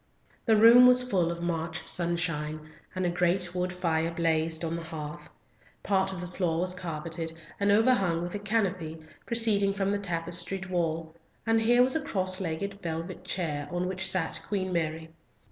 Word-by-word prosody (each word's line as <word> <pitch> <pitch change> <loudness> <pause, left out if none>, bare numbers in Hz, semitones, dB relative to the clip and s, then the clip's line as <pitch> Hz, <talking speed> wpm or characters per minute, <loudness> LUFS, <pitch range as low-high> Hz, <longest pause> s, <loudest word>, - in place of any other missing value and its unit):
The 220 -1 +5
room 235 +3 +9
was 250 0 +6
full 180 -7 +1
of 170 0 -6
March 165 -1 -3
sunshine, 155 -3 -2 0.2
and 185 0 -1
a - - +2
great 175 +1 +1
wood 180 0 -1
fire 165 -3 0
blazed 165 -1 +1
on 165 0 -2
the 170 -1 -5
hearth. 150 -2 -7 0.5
Part 190 -1 +1
of 185 -2 -6
the 180 - -5
floor 175 -2 -1
was 180 0 +2
carpeted, 165 -1 -4 0.3
and 200 0 +3
overhung 200 -7 +3
with 175 - -5
a 205 - -3
canopy, 195 -6 -1 0.3
proceeding 210 -4 +2
from 195 0 0
the 205 - 0
tapestried 180 +1 -3
wall, 165 -2 -1 0.3
and 225 0 +3
here 240 +2 +5
was 260 +3 +2
a 320 - +1
cross 185 -8 -2
legged 195 +4 -3
velvet 165 +1 -5
chair 150 -5 -2
on 175 +1 -2
which 190 +1 -2
sat 170 -4 -1
Queen 190 -3 -2
Mary. 160 -1 -2
180 Hz, 175 wpm, -28 LUFS, 165-195 Hz, 0.5 s, room